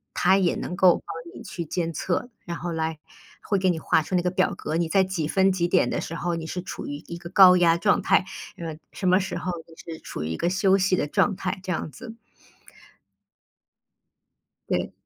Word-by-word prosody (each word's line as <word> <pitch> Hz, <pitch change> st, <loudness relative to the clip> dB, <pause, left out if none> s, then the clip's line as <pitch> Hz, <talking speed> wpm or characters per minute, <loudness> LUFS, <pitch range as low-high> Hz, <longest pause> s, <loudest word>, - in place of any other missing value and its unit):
它 190 Hz, +2 st, +4 dB
也 180 Hz, -3 st, +2 dB
能 180 Hz, -, -4 dB
够 180 Hz, -1 st, +6 dB
帮 165 Hz, +1 st, -8 dB
你 -, -, -9 dB
去 170 Hz, -, -5 dB
监 165 Hz, +1 st, -2 dB
测， 180 Hz, -, -2 dB, 0.2 s
然 170 Hz, -1 st, -4 dB
后 175 Hz, +1 st, -4 dB
来 160 Hz, -1 st, -2 dB, 0.4 s
会 200 Hz, -, 0 dB
给 185 Hz, 0 st, +2 dB
你 165 Hz, -3 st, 0 dB
画 160 Hz, -, +2 dB
出 170 Hz, +4 st, -3 dB
那 180 Hz, -, +3 dB
个 180 Hz, -, 0 dB
表 185 Hz, 0 st, +1 dB
格， 155 Hz, -, -3 dB
你 170 Hz, -1 st, 0 dB
在 195 Hz, +2 st, +4 dB
几 185 Hz, -5 st, -2 dB
分 190 Hz, +3 st, +3 dB
几 175 Hz, -2 st, 0 dB
点 180 Hz, -, +3 dB
的 -, -, -1 dB
时 165 Hz, -, -6 dB
候， 175 Hz, 0 st, -2 dB
你 165 Hz, -1 st, -5 dB
是 180 Hz, +2 st, -4 dB
处 -, -, -7 dB
于 145 Hz, -, -4 dB
一 170 Hz, -, -6 dB
个 170 Hz, -1 st, -9 dB
高 185 Hz, -2 st, +8 dB
压 170 Hz, -2 st, +4 dB
状 200 Hz, +4 st, +2 dB
态， -, -, +3 dB, 0.3 s
嗯， 160 Hz, -2 st, -6 dB
什 190 Hz, -, -3 dB
么 185 Hz, +1 st, +5 dB
时 190 Hz, 0 st, -3 dB
候 185 Hz, -, -3 dB, 0.2 s
你 165 Hz, -, -16 dB, 0.2 s
是 -, -, -9 dB
处 75 Hz, -, -6 dB
于 80 Hz, -, -3 dB
一 80 Hz, -, -2 dB
个 170 Hz, -, 0 dB
休 190 Hz, +1 st, +3 dB
息 190 Hz, -1 st, +2 dB
的 160 Hz, -, 0 dB
状 195 Hz, +6 st, +2 dB
态， 185 Hz, +1 st, -3 dB
这 190 Hz, -, -3 dB
样 155 Hz, -, -4 dB
子。 230 Hz, -2 st, -10 dB, 2.5 s
对。 -, -, -1 dB
180 Hz, 240 characters per minute, -25 LUFS, 165-190 Hz, 2.5 s, 高